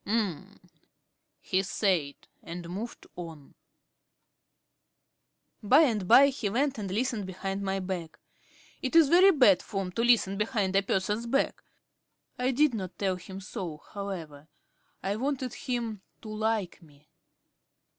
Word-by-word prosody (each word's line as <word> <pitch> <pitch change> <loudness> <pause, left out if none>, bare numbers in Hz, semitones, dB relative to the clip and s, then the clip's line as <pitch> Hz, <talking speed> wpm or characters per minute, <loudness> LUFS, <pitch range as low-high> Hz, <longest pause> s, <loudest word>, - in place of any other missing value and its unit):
"Um," 205 -6 -2 0.8
he 185 - 0
said, 185 -7 0 0.3
and 170 0 -7
moved 205 +7 -6
on. 165 -5 -9 2.1
By 255 +8 +6
and 220 - +1
by 280 +7 +8
he 250 -6 -3
went 265 +3 0
and 200 -2 -4
listened 215 0 -1
behind 195 +1 -4
my 195 0 -1
back. 180 -4 -5 0.6
It 260 +3 -3
is 325 -4 +7
very 365 +4 +7
bad 250 - +5
form 195 -3 -4
to 230 - -1
listen 220 -5 +3
behind 210 -4 0
a 195 - +5
person's 205 +4 -1
back. 275 +4 0 0.8
I 250 +1 +1
did 280 +1 +3
not 190 -5 -5
tell 190 -2 0
him 190 +2 -9
so 180 -4 -6 0.2
however. 165 -8 -6 0.6
I 200 +2 -1
wanted 260 0 -2
him 235 -6 -3 0.2
to 220 - -8
like 215 -4 -2
me. 150 -2 -21
200 Hz, 135 wpm, -28 LUFS, 185-240 Hz, 2.1 s, by